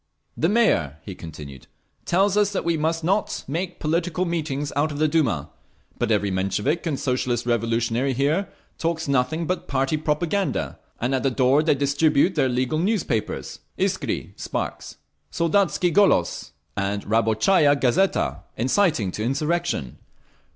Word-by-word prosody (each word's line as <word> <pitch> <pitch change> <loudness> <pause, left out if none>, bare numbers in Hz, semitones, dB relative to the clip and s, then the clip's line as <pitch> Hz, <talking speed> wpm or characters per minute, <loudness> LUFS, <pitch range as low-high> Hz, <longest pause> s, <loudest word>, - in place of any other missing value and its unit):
"The 165 - +1
Mayor," 205 - +2
he 100 - -7
continued, 75 -7 -10 0.4
"tells 195 +3 +2
us 205 -1 +3
that 190 - -2
we 170 -1 +2
must 160 +1 -1
not 195 +5 0
make 175 +6 -3
political 170 +3 0
meetings 150 -4 -2
out 150 +2 +1
of 145 - -5
the 155 +1 +3
Duma. 145 - 0 0.5
But - - 0
every 105 -2 +1
Menshevik 105 - -1
and 145 -4 -1
Socialist 125 -2 -1
Revolutionary 115 +2 0
here 150 +9 0 0.3
talks 165 -1 -1
nothing 140 +5 +1
but 185 +3 -3
party 135 +2 0
propaganda, 155 +2 -1 0.2
and 125 +3 -1
at 130 - +1
the 135 - +2
door 130 +3 +3
they 155 -2 +2
distribute 145 +4 +2
their 145 -5 +2
illegal 130 +4 0
newspapers, 180 - -1 0.2
Iskri - - -1
(Sparks), - - -4 0.3
Soldatski 175 0 +1
Golos 190 - +2 0.3
and 100 0 -2
Rabotchaya 115 - +3
Gazeta, 125 - +1 0.2
inciting 130 - +2
to 105 - -4
insurrection. 150 - -1
145 Hz, 140 wpm, -23 LUFS, 120-170 Hz, 0.5 s, us